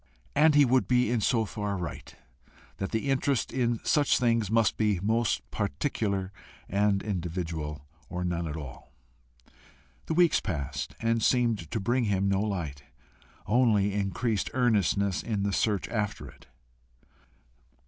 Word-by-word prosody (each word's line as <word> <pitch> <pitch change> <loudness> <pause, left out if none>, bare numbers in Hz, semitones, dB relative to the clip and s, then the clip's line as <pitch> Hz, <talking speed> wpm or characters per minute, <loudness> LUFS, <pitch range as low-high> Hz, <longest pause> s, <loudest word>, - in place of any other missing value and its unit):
And 155 0 +5
he 145 -1 +7
would 130 +1 +2
be 125 -2 +2
so 110 +1 +2
far 105 -1 -3
right, 85 -2 -7 0.6
that 95 - -3
the 115 +5 -1
interest 135 -1 0
in 120 -3 0
such 145 -2 +3
things 115 -4 +1
must 110 -2 +2
be 105 -4 +1
most 110 +4 0
particular 100 -3 -2 0.4
and 100 0 +1
individual, 80 -6 -4 0.2
or 90 0 -3
none 85 -1 -2
at 75 0 -5
all. 70 -6 -9 1.2
The 160 - -1
weeks 175 -2 +4
passed 70 -7 -4
and 115 0 +1
seemed 115 - +1
to 110 - -2
bring 120 +5 +1
him 100 -2 +1
no 100 0 +1
light, 85 -10 -3 0.6
only 105 -3 +3
increased 100 +2 -1
earnestness 100 -5 +2
in 105 -4 -2
the 100 0 -1
search 105 -2 0
after 105 -3 -3
it. - - -16
105 Hz, 140 wpm, -28 LUFS, 95-120 Hz, 1.2 s, he